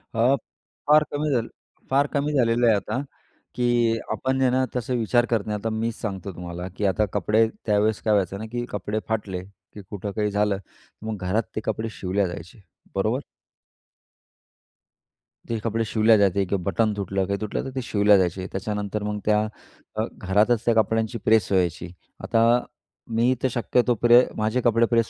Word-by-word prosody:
अ, 120 +5 +4 0.5
फार 150 +1 +6
कमी 150 +1 -1
झालं 120 -5 0 0.4
फार 140 +2 +3
कमी 145 +1 0
झालेलं 120 -3 +3
आहे 110 - +5
आता 105 +5 -2 0.6
की 120 -2 +2
आपण 130 0 -1
आहे 130 - +4
ना, 130 +1 +2
तसा 125 +1 -2
विचार 120 0 +2
करत 115 -4 -1
नाही. 105 -1 -1
आता 115 - -2
मीच 110 +1 -2
सांगतो 100 -2 -4
तुम्हाला 90 0 -6
की 105 - -1
आता 100 +2 +2
कपडे, 110 +1 +3 0.2
त्यावेळेस 105 0 +1
काय 110 - +2
व्हायचं 100 -2 +1
ना 110 - -5
की 120 0 -3
कपडे 105 +1 -3
फाटले 100 -5 -3 0.3
की 105 - -9
कुठं 100 0 -5
काही 105 +1 -1
झालं, 105 -1 +1
तर 100 +2 -18
मग 110 -1 -3
घरात 110 +5 +1
ते - - -2
कपडे 110 +1 -2
शिवल्या 95 0 -1
जायचे, 90 +4 -9 0.3
बरोबर? 110 +6 +1 2.3
ते 115 - -1
कपडे 115 0 0
शिवल्या 110 +1 +4
जायचे 100 -1 +3
किंवा 95 +1 -1
बटन 110 +3 +1
तुटलं, 95 -1 -1
काही 100 +1 -2
तुटलं 105 - -2
तर - - -4
ते 130 - -1
शिवल्या 105 -3 +4
जायचे. 95 0 0
त्याच्यानंतर 105 +1 -3
मग 105 0 -2
त्या 105 0 +4 0.6
अ, - - 0
घरातच 105 +5 +2
त्या 120 - +4
कपड्यांची 110 +1 +1
प्रेस 110 -4 +3
व्हायची. 90 -2 0 0.3
आता 115 +2 +3 0.5
मी 120 +3 +3
तर - - +4
शक्यतो 120 +1 +1
प्रे 120 +1 +7
माझे 110 +4 0
कपडे 115 0 +3
प्रेस 115 -1 +1
110 Hz, 175 wpm, -24 LUFS, 100-120 Hz, 2.3 s, प्रे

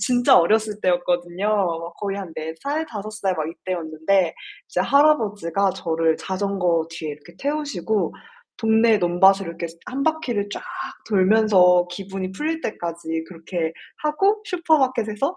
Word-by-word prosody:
진짜 245 +4 +4
어렸을 210 +4 +2
때였거든요. 175 +2 0
막 170 -5 -1
거의 200 -1 -2
한 185 -5 -7
4 160 +1 -4
살, 305 +3 -1
5 215 -6 -6
살 200 -3 -1
막 155 -1 -2
이때였는데 170 +1 -1 0.3
이제 - - -1
할아버지가 210 - +3
저를 165 -2 0
자전거 185 -4 0
뒤에 160 -2 -5
이렇게 150 +4 -12
태우시고 280 - -1 0.5
동네 225 0 +4
논밭을 190 +2 +4
이렇게 170 0 -5 0.2
1 270 +2 -3
바퀴를 270 -10 -1
쫙 - - -5 0.5
돌면서 190 -3 +5
기분이 190 0 -5
풀릴 315 +10 -2
때까지 165 - -4
그렇게 165 -1 -4 0.3
하고 390 +8 +2
슈퍼마켓에서 275 - +1
195 Hz, 300 characters per minute, -22 LUFS, 175-225 Hz, 0.5 s, 돌면서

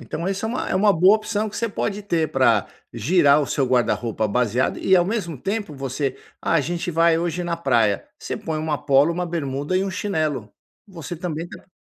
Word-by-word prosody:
Então, 170 +3 -4
esse 195 +2 -2
é 220 - -1
uma 245 - -3
é - - -1
uma 205 +2 +4
boa 185 +4 +5
opção 215 0 -2
que - - -8
você 230 - -1
pode 205 0 -3
ter 170 -5 0
pra 115 -6 +3 0.3
girar 145 - +4
o 145 - -1
seu 135 +2 0
guarda-roupa 120 -3 0
baseado 125 +3 0
e 190 - +3
ao 175 -2 +5
mesmo 185 - -3
tempo 200 -4 -3
você: 135 +1 -3 0.2
“Ah, - - -1
a 165 - +4
gente 175 +4 -3
vai 165 0 +3
hoje 175 +1 -2
na 170 -1 -2
praia”, 115 - +1
você - - -5
põe 160 -1 -4
uma 155 -1 -1
polo, 145 +2 +3
uma 180 +1 -2
bermuda 145 -1 -2
e 185 - +2
um 195 - -3
chinelo. 155 - -2 0.3
Você 175 -3 -7
também 165 0 -4
tá - - -12
165 Hz, 215 wpm, -22 LUFS, 135-185 Hz, 0.3 s, boa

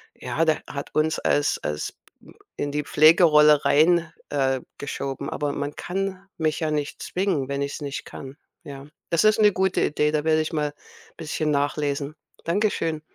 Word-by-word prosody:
ja, 165 - -1
der 155 -1 +1
hat 140 -1 -7
uns 155 +1 +1
als 145 0 +1
als 75 0 -4 0.3
m - - -17 0.2
in 145 - -3
die 150 +1 -2
Pflegerolle 150 -1 +5
rein, 165 +2 +4 0.2
äh, 135 -2 0 0.2
geschoben, 140 -1 -4
aber 145 -1 -2
man 145 +1 -4
kann 195 +1 -4
mich 155 -2 0
ja 160 - 0
nicht 150 -1 -3
zwingen, 180 -8 -1
wenn 140 0 -2
ich 140 - -4
es - - -7
nicht 140 -1 -5
kann, 135 +1 -10 0.3
ja? 140 -1 -9 0.2
Das 170 - +2
ist 215 0 +4
'ne 210 -1 +6
gute 190 -1 0
Idee, 150 0 +1
da 150 -1 0
werde 155 0 +3
ich 155 +2 -4
mal 150 -2 -1 0.4
bisschen 155 0 -2
nachlesen. 145 0 -1 0.3
Danke 205 +6 +2
schön. 160 -2 -2
150 Hz, 180 wpm, -24 LUFS, 145-165 Hz, 0.4 s, ne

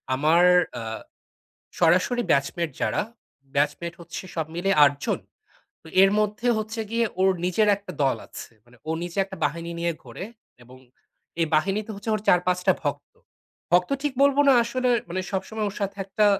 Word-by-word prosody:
আমার 155 +6 +4 0.4
আ - - -5 1.0
সরাসরি 180 +9 +3
batchmate 155 +4 0
যারা - - +1 0.5
batchmate 150 +4 0
হচ্ছে 170 +2 -7
সব 160 -2 -1
মিলে 185 +3 0
৮ 145 0 +5
জন। - - 0 0.6
তো - - -14
এর 195 0 +6
মধ্যে 210 +3 -1
হচ্ছে 220 +1 -3
গিয়ে 230 0 +2 0.2
ওর 190 0 +5
নিজের 195 +4 +2
একটা 200 -1 -10
দল 135 - +2
আছে। - - -10
মানে 120 +1 -21
ওর 160 - 0
নিজে 175 +2 -7
একটা 190 0 -10
বাহিনী 165 +3 -3
নিয়ে 170 0 0
ঘোরে 190 - -8 0.4
এবং 125 +2 -15 0.6
এই 165 - +2
বাহিনীতে 195 +7 0
হচ্ছে 205 +3 -6
ওর 215 - -4
৪-৫ 180 0 +3
টা - - +6
ভক্ত। - - -4 0.6
ভক্ত 180 0 +4
ঠিক 290 -2 -1
বলবো 280 0 +4
না, - - +7
আসলে 250 +2 -1 0.2
মানে 185 +2 -2
সবসময় 210 +3 -3
ওর 200 - -11
সাথে 200 0 -3
একটা 205 +2 +1
185 Hz, 170 wpm, -25 LUFS, 165-210 Hz, 1.0 s, না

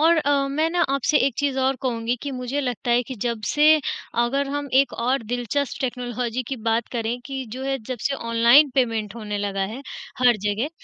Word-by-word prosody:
और 330 +2 +5
अ, 285 -3 +2
मैं 310 +4 +1
ना 350 - 0
आपसे 275 +2 +2
एक 275 - -1
चीज़ 280 -2 0
और 265 0 +1
कहूँगी 235 -1 -1
कि 285 - -3
मुझे 255 +2 -3
लगता 250 -1 -3
है 240 +1 +4
कि 260 +2 -7
जब 235 -2 -1
से 305 +1 +5 0.4
अगर 275 +3 0
हम 285 0 -3
एक 275 - -1
और 250 +2 0
दिलचस्प 250 +5 -2
टेक्नोलॉजी 245 -1 -2
की 270 - -3
बात 225 +1 +1
करें 235 0 -2
कि 270 -1 -4
जो 260 +2 -5
है 270 0 -1
जब 255 -3 -3
से 275 - -1
ऑनलाइन 235 +4 +5
पेमेंट 225 -5 0
होने 210 -3 -4
लगा 200 -1 -2
है 255 - -7 0.4
हर 245 -3 +5
जगह, 210 +6 0
255 Hz, 205 wpm, -23 LUFS, 235-275 Hz, 0.4 s, और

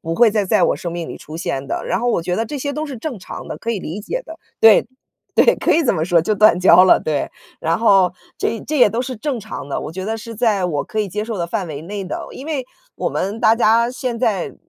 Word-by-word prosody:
不 165 +1 -3
会 230 +3 +5
再 210 -1 0
在 185 - +2
我 - - +2
生 170 -1 -5
命 170 -1 -5
里 - - -7
出 155 +2 -9
现 140 -5 -3
的。 - - -3
然 - - -1
后 245 - 0
我 200 - +1
觉 180 +1 -2
得 225 - -1
这 290 - -5
些 285 +1 -3
都 305 +2 -3
是 275 - -7
正 240 -1 -5
常 - - -9
的， - - -6
可 230 - -3
以 205 - -3
理 170 +7 -6
解 - - -4
的。 325 +1 -10 0.2
对， 225 -2 +7 0.5
对， 485 - +5
可 - - +1
以 330 - +2
这 245 - +3
么 160 -4 -1
说， 170 -1 +3
就 195 - 0
断 210 -3 +5
交 185 0 +7
了， 185 - +5
对。 150 -3 -1 0.3
然 165 +1 +1
后 195 -5 +4 0.3
这 230 - -2
这 305 - 0
也 245 - +7
都 230 +4 -2
是 255 0 -5
正 255 +1 -3
常 215 -9 -7
的， - - -2
我 - - -6
觉 185 +3 -6
得 220 +2 -2
是 230 0 -9
在 215 -5 +1
我 150 -5 -1
可 215 - -3
以 210 - -2
接 210 +3 -3
受 225 -2 -4
的 170 - -1
范 180 +2 -3
围 150 -2 -7
内 200 +3 -5
的。 185 - -5
因 270 - -9
为 295 -5 -2 0.3
我 - - -2
们 205 +4 -3
大 225 +1 +4
家 230 +1 +3
现 250 -1 -3
在， 215 -7 -1
210 Hz, 300 characters per minute, -19 LUFS, 180-240 Hz, 0.5 s, 对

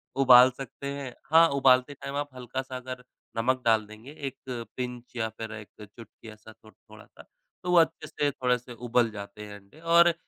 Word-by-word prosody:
उबाल 130 -1 +8
सकते 135 +1 -7
हैं। 140 -3 -6 0.2
हाँ, 165 +1 +7
उबालते 135 0 +3
टाइम 140 0 -7
आप 145 0 -2
हल्का-सा 130 +1 -5
अगर 125 0 -8 0.3
नमक 130 +3 +1
डाल 110 -2 +3
देंगे 110 +6 -12 0.2
एक 135 - -7 0.4
पिंच 125 0 -6
या 110 -2 -1
फिर 110 0 -8
1 105 -1 -9
चुटकी 110 +2 -13
ऐसा 110 +1 -14
थो 110 0 -19
थोड़ा-सा 110 -2 -17 0.4
तो 180 - -1
वो 175 - +5
अच्छे 160 -1 +1
से 145 -1 -1
थोड़े 125 -1 +1
से 125 0 -12
उबल 120 -1 +3
जाते 105 0 -9
हैं 105 0 -10
अंडे। 100 +10 -21
और 170 +1 +5
125 Hz, 185 wpm, -27 LUFS, 110-140 Hz, 0.4 s, उबाल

